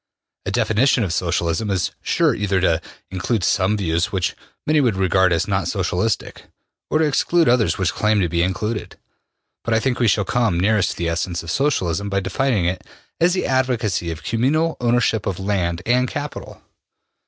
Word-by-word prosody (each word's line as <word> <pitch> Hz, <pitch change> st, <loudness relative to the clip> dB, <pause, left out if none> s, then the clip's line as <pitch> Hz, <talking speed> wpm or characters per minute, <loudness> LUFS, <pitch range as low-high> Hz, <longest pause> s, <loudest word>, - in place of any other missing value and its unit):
A -, -, -1 dB
definition 120 Hz, +2 st, +2 dB
of 90 Hz, -5 st, -2 dB
Socialism 85 Hz, +3 st, -1 dB
is 95 Hz, -3 st, 0 dB
sure -, -, +2 dB
either 100 Hz, -2 st, 0 dB
to 85 Hz, -3 st, +2 dB, 0.3 s
include 95 Hz, +3 st, -1 dB
some 95 Hz, +3 st, +2 dB
views 85 Hz, -3 st, 0 dB
which 95 Hz, -2 st, -1 dB, 0.3 s
many 155 Hz, 0 st, +3 dB
would 120 Hz, -7 st, +1 dB
regard 95 Hz, -1 st, +2 dB
as 80 Hz, -, +1 dB
not 95 Hz, -2 st, 0 dB
Socialistic, 95 Hz, +2 st, -2 dB, 0.4 s
or -, -, +2 dB
to 160 Hz, -, +3 dB
exclude 165 Hz, +3 st, +2 dB
others 120 Hz, -2 st, +3 dB
which 95 Hz, -3 st, 0 dB
claim 110 Hz, 0 st, +1 dB
to 90 Hz, -, +2 dB
be 85 Hz, +1 st, 0 dB
included. 105 Hz, +5 st, -2 dB, 0.7 s
But 115 Hz, -, 0 dB
I -, -, +3 dB
think 125 Hz, +1 st, -1 dB
we 120 Hz, -, +3 dB
shall 105 Hz, -1 st, +2 dB
come 115 Hz, -8 st, +1 dB
nearest 100 Hz, 0 st, +2 dB
to -, -, -16 dB
the 85 Hz, -, -2 dB
essence 85 Hz, +1 st, -2 dB
of 85 Hz, -, -5 dB
Socialism 100 Hz, -, 0 dB
by 100 Hz, 0 st, 0 dB
defining 100 Hz, +1 st, 0 dB
it 90 Hz, +2 st, -2 dB, 0.4 s
as 175 Hz, +2 st, +3 dB
the 185 Hz, -, -1 dB
advocacy 120 Hz, -9 st, 0 dB
of 80 Hz, -2 st, -6 dB
communal 140 Hz, -, +1 dB
ownership 120 Hz, -3 st, +1 dB
of 95 Hz, -2 st, -2 dB
land 90 Hz, -3 st, -1 dB
and 125 Hz, +2 st, +2 dB
capital. 145 Hz, +2 st, -7 dB
100 Hz, 180 wpm, -21 LUFS, 90-120 Hz, 0.7 s, many